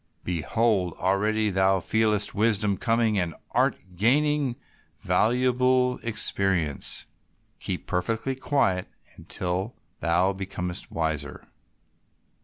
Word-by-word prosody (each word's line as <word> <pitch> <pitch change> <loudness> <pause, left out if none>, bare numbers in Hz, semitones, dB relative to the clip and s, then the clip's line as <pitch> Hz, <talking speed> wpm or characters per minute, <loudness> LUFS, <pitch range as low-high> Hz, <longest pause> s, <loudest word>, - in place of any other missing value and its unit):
Behold, 90 +2 0
already 105 +3 +1
thou 95 0 +3
feelest 105 +1 +1
wisdom 105 -1 +2
coming, 115 0 +1
and 85 -3 -2 0.2
art - - +2 0.2
gaining 140 - +2 0.4
valuable 125 +2 +2
experience. 95 - 0 0.5
Keep - - -4
perfectly 110 +8 -1
quiet 130 -9 0 0.3
until 95 +5 -4 0.2
thou 90 +3 +2
becomest 90 -2 -5
wiser." 80 -3 -3
105 Hz, 85 wpm, -26 LUFS, 90-115 Hz, 0.5 s, thou